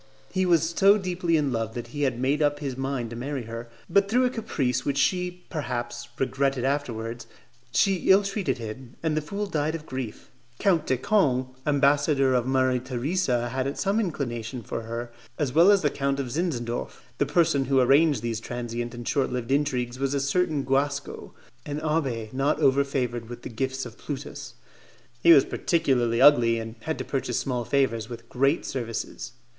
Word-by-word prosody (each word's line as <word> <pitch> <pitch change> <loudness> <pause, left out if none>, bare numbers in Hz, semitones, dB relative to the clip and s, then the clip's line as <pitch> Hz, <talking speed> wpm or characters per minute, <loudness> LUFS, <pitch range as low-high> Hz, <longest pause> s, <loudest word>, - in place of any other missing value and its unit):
He 185 -1 +1
was 165 -2 +3
so 195 +4 +5
deeply 180 -3 0
in 145 -3 0
love 115 -2 -2
that 120 -1 -5
he 145 +4 -5
had 130 -4 0
made 135 +4 +1
up 145 -1 +2
his 140 -3 -4
mind 135 -3 -3
to - - -6
marry 135 +2 -4
her; 115 +1 -7 0.2
but 200 0 +3
through 250 +4 +3
a 250 - +1
caprice 130 - -1
which 140 -1 -1
she, 180 +4 0
perhaps, 120 -5 -4
regretted 135 -1 0
afterwards, 120 -4 -2 0.4
she 195 +5 +2
ill 195 +2 +7
treated 195 - -1
him, 120 +2 -8
and 160 -2 +1
the 155 - +1
fool 200 +7 -4
died 155 -4 -1
of 160 -2 -7
grief. 130 -6 -6 0.3
Count 170 -3 +2
de 130 - +2
Canes. 130 - +2 0.2
ambassador 140 -1 +3
of 125 -1 +1
Maria 130 -1 +2
Theresa, 130 0 -1
had 135 +3 -2
some 200 +2 +1
inclination 125 - -3
for 115 - -4
her, 115 +1 -5 0.3
as 140 -5 -1
well 170 +5 +6
as 200 -3 +5
the 145 - +2
Count 140 0 -1
of 130 -3 -3
Zinzendorf. 125 -8 -3 0.2
The 145 - +2
person 145 -4 +2
who 135 +1 +3
arranged 140 0 +4
these 115 -2 -2
transient 120 0 -5
and 120 -1 -7
short 140 -2 +1
lived 125 0 -3
intrigues 130 -3 0
was 135 +1 0
a - - +1
certain 150 +1 +1
Guasco, 140 +1 -2 0.3
an 145 0 -4
abbé 135 -8 -1
not 135 +3 +1
over 135 +1 +4
favoured 120 -4 -3
with 120 0 -8
the - - -6
gifts 130 +2 -3
of 120 -1 -11
Plutus. 145 -2 -7 0.7
He 170 - +7
was 140 -5 +8
particularly 125 -8 +1
ugly, 120 -5 +6
and 115 0 -5
had 160 +7 -3
to - - -5
purchase 130 -3 -2
small 125 -3 -2
favours 115 -4 0
with 115 -1 -9
great 135 +5 +1
services. 115 -2 -4
135 Hz, 185 wpm, -26 LUFS, 120-150 Hz, 0.7 s, was